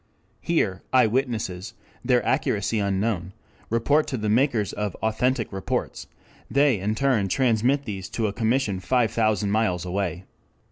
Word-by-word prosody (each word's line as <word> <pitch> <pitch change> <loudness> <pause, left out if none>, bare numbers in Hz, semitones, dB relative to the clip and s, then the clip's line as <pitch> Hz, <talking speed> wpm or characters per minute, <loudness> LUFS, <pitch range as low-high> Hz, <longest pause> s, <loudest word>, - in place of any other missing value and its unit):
Here 100 - 0
eyewitnesses, 115 -6 0 0.3
their 125 -1 +2
accuracy 105 +1 0
unknown, 100 -2 -1 0.4
report 140 +7 +2
to 130 - -3
the 105 -1 -2
makers 115 -3 +2
of 105 -3 -3
'authentic 115 +1 -1
reports'; 95 -1 -3 0.4
they 140 -6 +3
in 105 +3 -1
turn 125 -6 +1
transmit 125 +5 +2
these 95 -3 -5
to 115 - +1
a 100 - -1
commission 110 -2 0
five 115 +5 +1
thousand 110 -3 +1
miles 105 -5 0
away. 90 -1 -3
110 Hz, 135 wpm, -24 LUFS, 100-125 Hz, 0.4 s, they